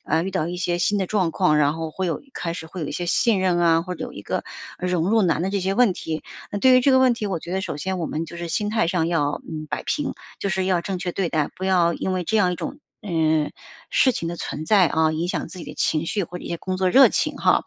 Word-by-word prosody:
呃， 165 - +1
遇 190 - -3
到 175 -3 -1
一 180 - -4
些 175 -1 -1
新 200 +4 +1
的 190 - 0
状 185 -5 +1
况， 160 -3 +2
然 145 -1 +3
后 160 -1 -4
会 190 +3 -3
有 165 - -2
开 170 -1 -3
始 160 - -7
会 175 +2 -8
有 150 - -2
一 - - -5
些 175 - -3
信 200 +2 +2
任 180 -2 +2
啊， 165 -1 +4
或 180 +1 -5
者 - - -5
有 - - -8
一 - - -8
个， - - -3 0.3
呃， 180 - -3
融 180 0 +1
入 225 -1 +4
难 170 -3 +2
的 190 - 0
这 200 0 -1
些 190 +1 0
问 245 -5 +4
题。 160 -2 -4 0.3
那 205 - -1
对 255 +3 +6
于 - - +6
这 275 - +3
个 260 - +6
问 255 -2 +4
题， 215 -2 -4
我 190 -4 -2
觉 170 +3 -8
得 190 - 0
首 150 - -4
先 185 +4 -2
我 165 - -2
们 160 +2 -3
就 170 - -9
是 170 0 -5
心 205 +4 -1
态 215 -6 +2
上 170 -2 +1
要， 145 -4 0
嗯， 155 -1 -5
摆 - - -2
平， 295 -3 -1 0.3
就 200 - -2
是 190 -1 0
要 185 -2 +2
正 190 0 -3
确 180 -1 -3
对 190 -4 -1
待， 155 -2 0
不 190 - -5
要 175 -3 +3
因 190 - -2
为 185 - -1
这 220 - 0
样 180 -4 +3
一 - - -4
种， 285 - -5 0.2
呃， 160 -5 +1 0.4
事 260 - +4
情 165 - -3
的 170 - -4
存 155 - -5
在， 195 -3 +5
啊， 160 -1 +2
影 165 +2 -1
响 - - -2
自 185 - -10
己 - - -7
的 - - -8
情 155 +1 0
绪 205 - -1
或 180 +2 -8
者 - - -11
一 - - -6
些 170 - -2
工 185 +2 -3
作 185 0 +1
热 270 +5 +8
情 - - -1
哈。 - - +3
180 Hz, 330 characters per minute, -23 LUFS, 165-195 Hz, 0.4 s, 热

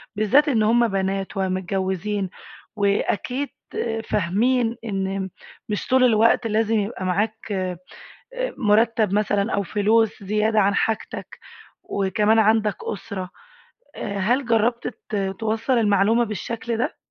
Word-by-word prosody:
بالذات 225 +9 +4
إن 230 -7 +2
هم 235 +2 +4
بنات 195 0 -2
ومتجوزين 190 +1 -1 0.5
وأكيد 215 +6 0 0.6
فاهمين 225 +6 +1
إن 195 -2 -2 0.4
مش 210 - -3
طول 260 0 +4
الوقت 230 0 +4
لازم 220 0 +1
يبقى 200 -2 -3
معاك 210 +4 -1
آآ 185 -2 -2 0.8
مُرتّب 220 -2 +3
مثلًا 205 +1 +1
أو 200 - +1
فلوس 210 +3 +1
زيادة 215 +2 +1
عن 200 0 +3
حاجتك 225 +1 -2 0.4
وكمان 210 +3 +1
عندك 215 -1 +3
أسرة، 195 -3 -5 0.7
آآ، 200 - -4
هل 245 +8 +1
جربت 235 +1 +1 0.2
ت 215 - -3 0.2
توصّل 225 +3 0
المعلومة 210 +2 +3
بالشكل 225 +2 -4
ده؟ 240 - -2
210 Hz, 115 wpm, -23 LUFS, 195-225 Hz, 0.8 s, بالذات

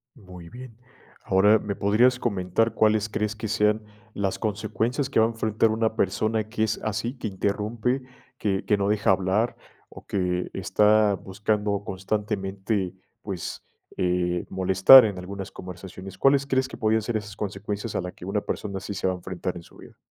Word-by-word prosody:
Muy 90 -7 -12
bien, 125 -2 -11 0.5
ahora, 105 +3 +4
¿me 100 -1 -4
podrías 115 +6 +3
comentar, 100 0 0
cuáles 110 -1 +2
crees 105 0 -2
que 110 0 -5
sean 105 0 +1 0.3
las 100 -2 -1
consecuencias 115 +5 -1
que - - +3
va 110 - +6
a - - -3
enfrentar 110 -1 +1
una 110 0 0
persona 110 +3 0
que 110 -1 -1
es 110 0 0
así, 110 +3 -2
que 115 - -4
interrumpe, 110 +6 -1 0.4
que 95 -2 -1
que 105 - +2
no 100 0 0
deja 105 -1 +2
hablar, 95 +5 +1 0.3
o - - -13
que 90 -2 -1
está 105 +2 +3
buscando 100 +1 -2
constantemente, 95 0 -2 0.3
pues, 95 -5 -6 0.3
eh, 90 -1 0
molestar 95 +7 +8
en 100 -3 -3
algunas 95 +1 -7
conversaciones?, 95 +1 -9
¿cuáles 140 +3 +4
crees 130 -1 +1
que - - -10
podrían 110 -1 +2
ser 115 0 -1
esas 105 -1 -8
consecuencias 105 +1 -4
a - - 0
la 90 0 -5
que - - -12
una 100 +2 -1
persona 100 -2 -4
sí 100 - -6
se - - -3
va 95 - +1
a - - -4
enfrentar 90 0 -5
en 85 - -7
su - - -18
vida? - - -15
105 Hz, 175 wpm, -25 LUFS, 95-110 Hz, 0.5 s, molestar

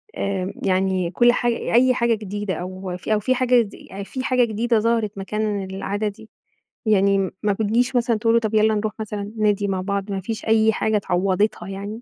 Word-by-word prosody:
آآ، 195 -1 -2
يعني 185 -2 +1
كل 240 +6 +5
حاج 240 -1 +1
أي 250 +2 +3
حاجة 235 -2 +2
جديدة 205 -2 -3
أو 185 0 -5
ف 180 - -9
أو 215 -1 +3
في 255 +5 +1
حاجة 250 -1 +4
دي 210 -3 -6
يعني 195 +1 -9
في 260 +5 -5
حاجة 255 -1 +3
جديدة 230 +1 +1
ظهرت 225 -2 0
مكان 205 +1 -2
العادة 195 +2 -3
دي، 210 +2 -8 0.6
يعني 200 -2 +3 0.3
ما 205 -1 +2
بتجيش 230 +5 0
مثلًا 235 -2 +2
تقول 225 +1 +2
له 235 - +5
طب 220 -1 -3
يلّا 220 0 +4
نروح 210 0 -2
مثلًا 210 -1 -4
النادي 210 -1 0
مع 190 -2 -1
بعض؟ 200 +1 -3
ما 195 -1 -2
فيش 220 +3 -5
أي 220 0 +4
حاجة 215 -1 0
عوضتها 185 +1 +1
يعني؟ 200 +3 -6
210 Hz, 200 wpm, -22 LUFS, 195-225 Hz, 0.6 s, كل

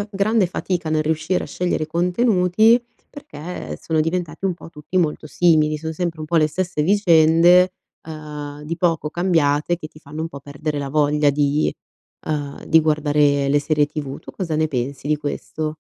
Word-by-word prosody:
c'è 205 - -3
grande 200 0 +2
fatica, 175 -2 -3
nel 155 0 +1
riuscire 160 +3 -1
a - - -9
scegliere 175 -3 -2
contenuti, 180 +5 +3 0.3
perché 175 - -8
sono 160 -1 0
diventati 165 +1 -3
un 190 - +2
po' 170 - -12
tutti 155 +3 -4
molto 155 -2 -1
simili. 155 -2 +2
Son 160 +1 -5
sempre 170 -2 -3
un 155 - -5
po' 170 +2 0
le 155 -1 +4
stesse 170 0 -2
vicende, 175 -1 +5 0.4
ehm, 150 -2 -8
di 165 +3 -4
poco 165 -3 0
cambiate 165 -2 +1
che 160 -2 -8
ti 155 - -17
fanno 150 +1 -9
un 165 - -3
po' 140 -3 -10
perdere 145 +2 -4
la 140 -1 -4
voglia 150 +1 +2
di, 145 +1 +1 0.5
ehm, 145 -2 -4
di 160 0 +5
guardare 145 -2 +2
le 145 +1 +3
serie 150 0 +1
TV. 145 -2 -6
Tu - - -11
cosa 165 -5 -3
ne 155 0 +1
pensi 135 +1 -4
di 150 - +2
questo? 155 +1 -4
155 Hz, 180 wpm, -21 LUFS, 150-175 Hz, 0.5 s, vicende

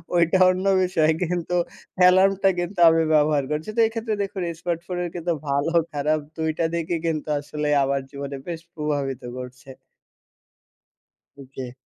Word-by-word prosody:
ওইটা 170 +2 +3
অন্য 185 +1 -1 0.2
বিষয়, 160 -4 +2
কিন্তু 175 0 -2 0.4
অ্যালার্মটা 190 +2 +5
কিন্তু 175 +1 -4
আমি 165 0 +3
ব্যবহার 150 -2 +3
করছি, 155 +7 -3
তো - - -1
এক্ষেত্রে 225 -1 -3
দেখুন 195 -1 -5 0.2
স্মার্টফোনের 175 +1 -3
কিন্তু 170 0 -1 0.2
ভালো, 140 +4 0 0.2
খারাপ 150 +2 +1 0.2
২ 160 0 -1
টা 165 - +1
দিকই 170 0 -1
কিন্তু 155 -1 -2
আসলে 150 +1 -4 0.2
আমার 135 0 0
জীবনে 140 0 -6
বেশ 165 -2 -4 0.2
প্রভাবিত 145 -4 -2 0.2
করছে। 130 +1 -9 1.7
ওকে। 130 -2 -8
160 Hz, 135 wpm, -23 LUFS, 145-180 Hz, 1.7 s, অ্যালার্মটা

